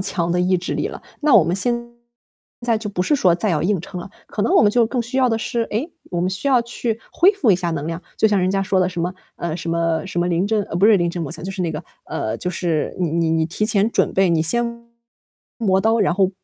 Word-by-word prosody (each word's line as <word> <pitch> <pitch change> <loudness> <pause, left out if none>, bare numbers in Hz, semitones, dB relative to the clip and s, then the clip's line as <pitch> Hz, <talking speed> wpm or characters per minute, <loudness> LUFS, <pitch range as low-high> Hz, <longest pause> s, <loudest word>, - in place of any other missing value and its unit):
强 175 -3 -1
的 180 +1 +1
意 185 +1 +2
志 180 - -4
力 - - -1
了， - - -8 0.2
那 295 -5 +4
我 185 - +8
们 170 +3 0
现 240 +4 +1 0.9
在 230 -2 +2
就 215 -1 -5
不 180 -3 -1
是 290 +10 +2
说 180 -8 +4
再 205 +4 -1
要 155 -4 +1
硬 190 +2 +1
撑 180 +2 -7
了。 180 - -8 0.2
可 210 - -4
能 220 - +2
我 - - +6
们 205 - +5
就 235 0 +3
更 240 +1 -1
需 255 +3 -3
要 255 -1 +4
的 225 - +1
是， 230 +1 -2
诶， 250 +12 -3 0.2
我 175 - 0
们 180 - 0
需 190 +9 -4
要 255 -4 +4
去 235 -1 -3
恢 380 +5 +4
复 310 - +2
一 185 - +5
下 175 -2 -2
能 155 0 -3
量。 165 +1 -4 0.2
就 220 - +4
像 205 -2 +2
人 185 0 +1
家 195 0 +1
说 195 -1 +1
的 180 0 +2
什 180 -2 -5
么， 180 +1 -1 0.2
嗯， 170 -1 -4
什 170 -1 -6
么 165 0 0
什 175 -2 -2
么 175 - +1
临 175 +3 +1
阵 215 -1 +1
呃， 170 - -5
不 195 - +4
是 215 -2 +6
临 175 -1 +1
阵 175 -1 -5
磨 150 - -4
枪， - - -7
就 190 - -3
是 190 -1 -5
那 170 -2 -1
个， 155 +2 -5 0.2
呃， 110 - -3
就 180 - -3
是 170 -3 -2
你 170 -4 0
你 165 0 +1
你 160 -1 +1
提 210 +5 -1
前 210 +1 +2
准 - - +1
备， 190 -2 +3
你 165 -1 +2
先 235 +6 -2 0.7
磨 190 -5 +2
刀， 225 +2 +2
然 190 -4 +3
后 190 -1 +2
190 Hz, 305 characters per minute, -21 LUFS, 170-225 Hz, 0.9 s, 我